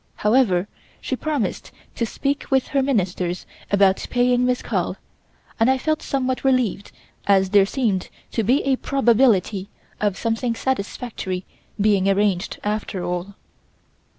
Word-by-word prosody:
However, 210 -5 +2 0.3
she 260 - -3
promised 280 -7 -2 0.2
to 230 - -2
speak 275 +5 -2
with 265 -2 +2
Her 280 -2 +2
Ministers 185 -8 -1 0.2
about 195 -1 +3
paying 245 0 +2
Miss 250 0 0
Carl, - - -1 0.6
and 225 +3 +4
I 265 - +3
felt 310 +4 -1
somewhat 260 -2 -1
relieved 255 -7 +1 0.4
as 190 -1 +4
there 200 -1 +5
seemed 210 -7 -1 0.2
to 230 - 0
be 250 +7 +2
a 270 -1 +2
probability 225 -8 +2 0.3
of 205 -2 0
something 230 +1 -1
satisfactory 205 -6 -3 0.3
being 200 -2 +3
arranged 195 -2 +1
after 205 -3 -2
all. 180 +3 -4
220 Hz, 130 wpm, -22 LUFS, 195-260 Hz, 0.6 s, there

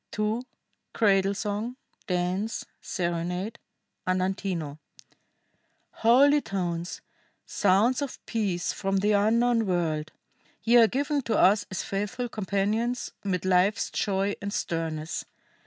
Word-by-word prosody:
[II. 215 +2 0 0.5
CRADLE 195 -2 +3
SONG. 215 +4 -3 0.3
DANCE. 185 +4 -1 0.2
SERENADE: 180 +4 -3 0.5
Andantino] 185 -5 -1 1.1
"Holy 280 +6 +5
tones, 175 -5 -3 0.4
sounds 210 +7 +2
of 280 -2 -4
peace 195 -6 -1
from 195 -1 -1
the 205 +2 +2
unknown 225 +2 +3
world! 160 -4 -1 0.5
Ye 235 +1 +5
are 230 -1 +8
given 285 +4 0
to 230 -3 0
us 200 +1 +4
as 190 - -3
faithful 210 +5 -3
companions 215 +4 -1
'mid 185 -3 -1
life's 185 +3 +2
joy 200 0 0
and 200 0 -3
sternness! 160 -4 -3
200 Hz, 105 wpm, -27 LUFS, 180-225 Hz, 1.1 s, are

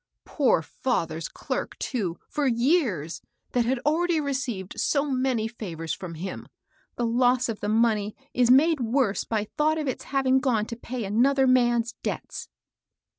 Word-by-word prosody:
" - - -60
Poor 260 - +2
father's 165 - -2
clerk, - - -4
too, 195 -10 -2
for 295 -2 -1
years, 235 - +1 0.3
that 245 -2 +1
had 260 +3 +1
already 330 +2 +2
received 260 -10 -3
so 285 -1 +1
many 255 -4 0
favors 165 -9 -5
from 175 -3 -7
him! 185 +4 -6 0.5
The 240 - -1
loss 245 +2 +3
of 225 -3 -4
the 205 - -2
money 215 -2 +2 0.2
is 245 -1 +3
made 300 +5 +5
worse 235 -3 +1
by 220 -2 -1 0.2
thought 310 +1 +3
of 305 -2 -2
its 260 - -3
having 265 -1 +2
gone 240 -6 +1
to 230 - -6
pay 240 0 -5
another 260 +7 +3
man's 240 -2 +3
debts." - - -5
245 Hz, 160 wpm, -26 LUFS, 210-270 Hz, 0.5 s, made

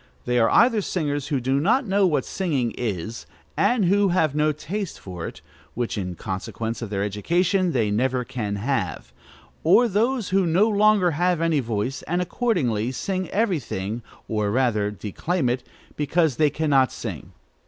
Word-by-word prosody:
They 125 0 +2
are 115 - +4
either 230 -2 +4
singers 145 -7 -2
who 145 -3 0
do 130 +2 +1
not 230 - +2
know 195 -1 +3
what 150 -6 0
singing 145 - -1
is, 110 -1 -4 0.3
and 240 -5 +2
who 200 +3 +3
have 160 -5 +2
no 150 +1 +2
taste 170 +6 -5
for 90 -3 -6
it, - - -10 0.3
which, 120 -1 -2
in 90 -4 -4
consequence 110 +6 -4
of 115 - -4
their 100 -1 -1
education, 175 - +1
they 110 -7 +1
never 125 +3 0
can 115 -5 -3
have; 105 -5 -2 0.5
or 220 +9 +5
those 230 +2 0
who 190 -1 +2
no 185 +7 +4
longer 210 -4 +4
have 175 +2 +1
any 165 -2 +2
voice, 115 +2 -2
and 175 +2 0
accordingly 165 - 0
sing 185 +7 -3
every 200 -5 +1
thing, 110 -1 -4 0.3
or, 105 -2 0
rather, 110 -3 +1
declaim 125 - -2
it, 125 +1 -1 0.3
because 150 -1 +1
they 155 -1 +4
cannot 140 -3 +2
sing. - - -7
145 Hz, 165 wpm, -24 LUFS, 115-185 Hz, 0.5 s, or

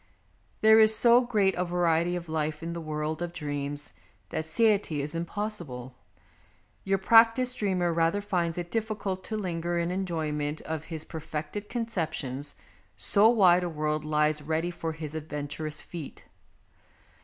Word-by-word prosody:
There 220 0 +7
is 220 0 +7
so 240 +2 +6
great 210 -6 +2
a 180 - -1
variety 175 -1 +1
of 175 -1 -5
life 155 0 -2
in 170 0 -3
the 170 - -5
world 155 +1 -3
of 175 -1 -3
dreams 145 -3 -4 0.4
that 160 - -3
satiety 205 -4 +2
is 145 +2 -3
impossible; 165 - -4 0.9
your 195 0 +1
prac 225 +4 +6
tised 255 -1 0
dreamer 180 -4 +1
rather 165 +4 +2
finds 180 -5 -1
it 175 -1 -5
difficult 210 -4 -2
to 220 - -3
linger 175 -3 -2
in 170 +1 0
enjoyment 155 -5 -2
of 160 -1 -5
his 160 -2 -6
perfected 160 +6 -6
con 235 -1 -2
ceptions, 150 - -3 0.4
so 210 +2 +5
wide 185 -6 +5
a 175 - -1
world 155 -1 -1
lies 150 0 +1
ready 160 +3 -1
for 165 -2 -4
his 155 -1 -7
adventurous 150 0 -5
feet. 165 -5 -9
170 Hz, 155 wpm, -28 LUFS, 155-195 Hz, 0.9 s, There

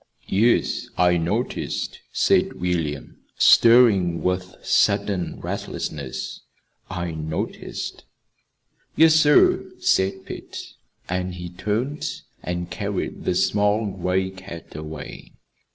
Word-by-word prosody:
"Yes, 115 +5 +2
I 90 -1 +4
noticed," 85 +1 -2
said - - +2
William, 80 -5 -2 0.2
stirring 105 -8 +6
with 90 0 -1
sudden 95 -4 +1
restlessness. 70 -4 -5 0.5
"I 85 -2 -3
noticed." 80 0 -5 0.9
"Yes, 160 0 +6
sir," 150 -2 +5
said 95 0 +1
Pete. - - -8 0.3
And 90 0 -2
he 90 0 -6
turned 115 +10 -2 0.3
and 90 0 -4
carried - - -4
the 90 - +1
small 105 +3 +2
gray 95 0 -1
cat 95 -4 -10
away. 75 -1 -8
90 Hz, 95 wpm, -23 LUFS, 85-105 Hz, 0.9 s, stirring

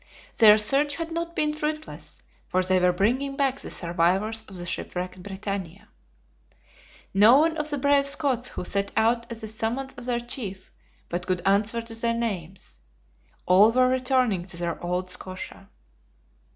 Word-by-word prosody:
Their 215 -1 +9
search 275 +7 +3
had 330 +1 -5
not 335 +1 -4
been 300 0 +1
fruitless, 305 0 -5 0.2
for 185 0 +1
they 185 0 +2
were 180 0 +3
bringing 250 +10 0
back 275 -1 +1
the - - -7
survivors 185 +6 0
of 190 - -9
the 175 - -6
shipwrecked 180 +1 -4
BRITANNIA. 195 -1 -6 1.2
Not 215 +7 +7
one 320 +1 +2
of 305 -1 -3
the 290 - -2
brave 280 0 +3
Scots 265 -4 0
who - - -6
set 200 +1 0
out 235 +1 +1
at 230 0 -6
the 220 - -5
summons 230 +5 -3
of 245 -3 -9
their 245 -1 0
chief, 220 -6 -6 0.4
but 180 +1 -4
could 180 -1 -1
answer 210 +4 +1
to 230 0 -9
their 230 +1 0
names; 195 -6 -5 0.7
all 195 +5 +6
were 255 +1 +3
returning 255 -6 +1
to 175 -2 -7
their 170 -1 -4
old 180 +1 -2
Scotia. 185 +1 -7
220 Hz, 165 wpm, -25 LUFS, 185-265 Hz, 1.2 s, Their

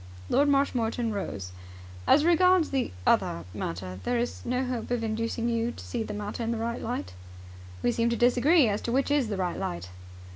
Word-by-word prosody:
Lord 285 - +4
Marshmoreton 240 -5 +1
rose. 100 - -4 0.6
"As 300 +2 +5
regards 360 0 +4
the 270 -2 0
other 85 0 +2
matter, 90 +2 -5
there 245 - 0
is 240 +1 -3
no 250 +2 -1
hope 250 -2 -3
of 240 -2 -1
inducing 230 +1 -1
you 230 0 0
to - - -10
see 240 - -3
the 220 - -4
matter 210 +2 -4
in 230 - -1
the 230 - -1
right 235 +1 -3
light?" 90 -1 -4 0.7
"We 240 - +3
seem 235 0 +1
to 235 - 0
disagree 250 +5 +4
as 205 0 -1
to 235 - -3
which 270 +3 +1
is 290 -5 +2
the 205 -2 -3
right 180 -2 -2
light." 90 +1 -4
235 Hz, 195 wpm, -28 LUFS, 210-255 Hz, 0.7 s, As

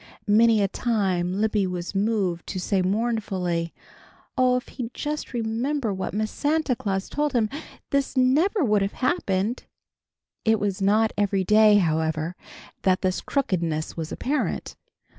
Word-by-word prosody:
Many 220 0 +4
a - - +3
time 190 -6 0
Libby 210 -2 +1
was 180 0 -4
moved 195 -4 0
to 185 - -4
say 190 +1 0
mournfully, 190 -5 -1 0.6
"Oh, 255 -1 +3
if 250 - -3
he'd 245 -2 -6
just 300 0 -4
remembered 235 +1 -1
what 190 - -3
Miss 215 0 -1
Santa 300 -3 0
Claus 195 -3 -2
told 295 -1 -1
him, 225 -3 +1 0.4
this 280 -1 0
never 305 - +3
would 210 -5 +2
have 195 +1 -1
happened!" 220 - 0 0.8
It 220 -1 +3
was 200 -2 -2
not 215 +3 +3
every 200 -2 +1
day, 210 +2 +6
however, 160 -2 0 0.5
that 185 0 +2
this 185 -1 0
crookedness 170 - -1
was 160 -1 -5
apparent. 290 +4 -2
210 Hz, 140 wpm, -25 LUFS, 185-245 Hz, 0.8 s, day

